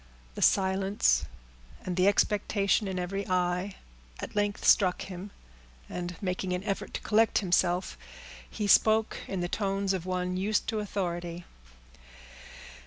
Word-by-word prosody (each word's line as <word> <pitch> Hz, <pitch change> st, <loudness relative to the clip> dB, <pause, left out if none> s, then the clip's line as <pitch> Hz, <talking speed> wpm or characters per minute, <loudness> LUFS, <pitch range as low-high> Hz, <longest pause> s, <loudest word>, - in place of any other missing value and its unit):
The -, -, -7 dB
silence, 195 Hz, +1 st, +3 dB, 0.6 s
and 180 Hz, -, -2 dB
the 185 Hz, +1 st, +3 dB
expectation 205 Hz, 0 st, +2 dB
in 190 Hz, -1 st, -3 dB
every 195 Hz, +2 st, -3 dB
eye, 180 Hz, +1 st, 0 dB, 0.4 s
at -, -, -7 dB
length 205 Hz, -1 st, -1 dB
struck 185 Hz, -4 st, +4 dB
him, 190 Hz, +1 st, -8 dB, 0.6 s
and 175 Hz, -1 st, -5 dB
making 185 Hz, -1 st, -2 dB
an 180 Hz, +1 st, -3 dB
effort 195 Hz, -1 st, -3 dB
to -, -, -3 dB
collect 225 Hz, 0 st, +3 dB
himself, 180 Hz, -1 st, +1 dB, 0.5 s
he 210 Hz, -, -3 dB
spoke, 220 Hz, +2 st, +4 dB
in 190 Hz, -2 st, -3 dB
the 175 Hz, -, -1 dB
tones 195 Hz, 0 st, -1 dB
of 185 Hz, -1 st, -4 dB
one 180 Hz, 0 st, -1 dB
used 210 Hz, +3 st, 0 dB
to 220 Hz, -2 st, -1 dB
authority. 175 Hz, -4 st, -4 dB
190 Hz, 135 wpm, -29 LUFS, 180-205 Hz, 0.6 s, struck